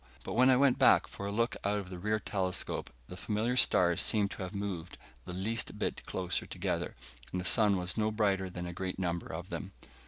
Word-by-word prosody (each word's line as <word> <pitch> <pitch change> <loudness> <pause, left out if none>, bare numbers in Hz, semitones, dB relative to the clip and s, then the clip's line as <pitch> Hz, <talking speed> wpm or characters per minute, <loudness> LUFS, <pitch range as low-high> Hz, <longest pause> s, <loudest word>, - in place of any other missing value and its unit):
But - - -5
when 125 +3 +5
I 130 - +6
went 135 -1 +4
back - - +6
for 100 - -7
a - - -2
look 115 +3 0
out 100 +1 +1
of 95 -2 -5
the 90 - -6
rear 105 +3 0
telescope, 95 -2 -2 0.2
the - - -8
familiar 110 +6 -1
stars 85 -8 +4
seemed 105 -2 +3
to - - -7
have 95 0 -4
moved 95 -4 -4 0.3
the - - -6
least 105 +6 -3
bit - - -2
closer 90 -1 -2
together, - - -2 0.4
and 90 - -2
the 90 - -4
sun 105 0 +4
was 90 +2 -3
no 110 0 +2
brighter 100 -3 +1
than 90 -1 -6
a 85 - -5
great 95 +1 -4
number 85 -2 -2
of 85 +4 -6
them. 95 0 -5
95 Hz, 220 wpm, -32 LUFS, 90-110 Hz, 0.4 s, I